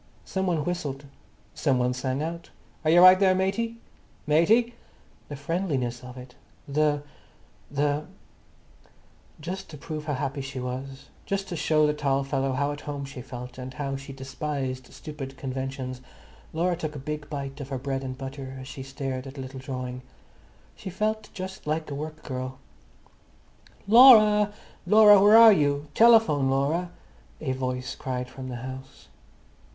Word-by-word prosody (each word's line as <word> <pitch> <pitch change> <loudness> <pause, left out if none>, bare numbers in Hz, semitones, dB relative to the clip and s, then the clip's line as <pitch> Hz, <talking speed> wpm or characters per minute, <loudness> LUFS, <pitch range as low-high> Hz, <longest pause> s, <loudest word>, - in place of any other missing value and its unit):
Some 190 0 -2
one 160 -5 0
whistled, 145 -6 -3 0.5
some 135 -4 +1
one 125 0 +1
sang 130 +3 -2
out, 165 +1 -5 0.3
"Are 155 - +1
you 175 +2 +7
right 185 +1 +9
there, 190 -2 +4
matey?" 205 +5 -1 0.5
"Matey!" 215 +11 +3 0.6
The 145 - -5
friendliness 140 -6 -2
of 125 0 -10
it, 125 0 -11 1.4
the—the—Just 150 +4 -7
to 150 - -9
prove 155 +1 -6
how 145 -2 -1
happy 140 +1 -3
she 135 0 -6
was, 130 +2 -6 0.2
just 195 0 -2
to 175 - -4
show 155 -1 +2
the 150 - +2
tall 140 -2 0
fellow 135 -1 -1
how 140 +2 0
at 145 - -7
home 145 -1 -5
she 135 -2 -8
felt, 125 0 -9
and 130 0 -7
how 135 0 -3
she 135 +1 -8
despised 135 -1 -5
stupid 135 -3 -8
conventions, 130 -1 -5 0.5
Laura 175 +2 0
took 155 -3 -5
a 140 -1 -8
big 150 -1 -5
bite 140 -1 -5
of 135 - -7
her 135 - -3
bread 135 +1 -3
and 130 -1 -5
butter 135 0 -7
as 130 - -9
she 135 - -8
stared 135 -1 -5
at 135 - -10
the 135 - -6
little 130 0 -8
drawing. 125 -1 -5 0.7
She - - -8
felt 215 +3 -2
just 190 -4 -7
like 155 0 -2
a - - -3
work 155 +2 -6
girl. 130 0 -5 1.3
"Laura, 215 -3 +8 0.4
Laura, 210 -2 +8
where 210 +2 +8
are 230 -1 +10
you? 145 -3 0
Telephone, 225 - +5
Laura!" 145 +7 0 0.5
a 140 -4 -2
voice 130 0 -3
cried 125 -1 -5
from 130 0 -8
the 125 - -5
house. 130 0 -10
140 Hz, 155 wpm, -26 LUFS, 130-170 Hz, 1.4 s, are